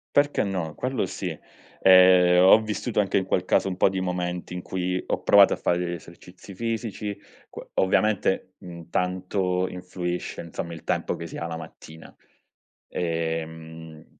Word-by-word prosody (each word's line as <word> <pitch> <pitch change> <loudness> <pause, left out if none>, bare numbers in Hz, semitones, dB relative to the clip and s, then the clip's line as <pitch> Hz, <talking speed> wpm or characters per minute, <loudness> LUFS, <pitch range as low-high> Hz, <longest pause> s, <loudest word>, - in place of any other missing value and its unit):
Perché 145 0 +3
no? 90 -6 -3
Quello 130 - -2
sì. - - -5 0.4
Ehm, 90 -1 +7
ho 100 +4 +8
vissuto, 110 +2 -3
anche 100 -1 +1
in 95 - -1
quel 90 - 0
caso, 95 - +2
un 90 - -4
po' - - +4
di 95 -1 -3
momenti 90 -1 -3
in 90 - -5
cui 90 0 -2
ho - - -2
provato - - +6
a - - 0
fare 85 - 0
degli 90 -1 -2
esercizi 90 +3 -11
fisici. 110 -1 -3
C - - -17 0.2
ovviamente, 95 -1 +1
mhmm, 85 -2 -11
tanto 90 0 -1
influisce, 90 -1 -5
insomma, 85 0 -6
il 80 - -9
tempo - - -1
che 85 - -7
si - - -9
ha 85 - -4
la 80 -1 -5
mattina. 80 0 -12 0.7
Ehm, 80 -1 -4
90 Hz, 160 wpm, -25 LUFS, 85-95 Hz, 0.7 s, ho